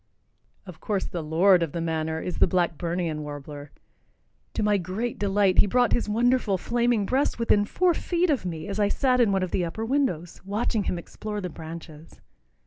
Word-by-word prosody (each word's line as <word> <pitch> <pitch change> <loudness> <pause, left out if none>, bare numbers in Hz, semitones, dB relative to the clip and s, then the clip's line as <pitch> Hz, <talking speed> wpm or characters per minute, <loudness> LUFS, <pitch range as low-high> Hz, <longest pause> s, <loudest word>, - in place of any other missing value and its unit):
Of 180 -4 -11
course 200 -3 -2
the 175 - -4
Lord 175 +4 +4
of 165 -4 -2
the 170 - -2
Manor 160 -1 -2
is 180 - -4
the - - +5
Blackburnian 170 -2 -1
warbler. 145 0 -8 0.8
To - - 0
my 210 -1 +3
great 195 +7 -4
delight, 200 -2 +3
he - - +5
brought 245 +4 +2
his 235 - 0
wonderful 235 -2 +2
flaming 235 0 +1
breast 265 +7 0
within 215 -3 +2
four 355 - +2
feet 345 +1 0
of 275 - 0
me 165 -1 -5
as 200 +1 -4
I 205 - +3
sat 250 +4 +1
in 225 -4 +3
one 190 -1 +1
of 185 - -3
the 180 - 0
upper 175 +7 -4
windows, 225 - -1
watching 205 +1 -1
him 180 - -1
explore 210 +4 -6
the 180 -3 -5
branches. 160 0 -10
195 Hz, 190 wpm, -26 LUFS, 165-225 Hz, 0.8 s, the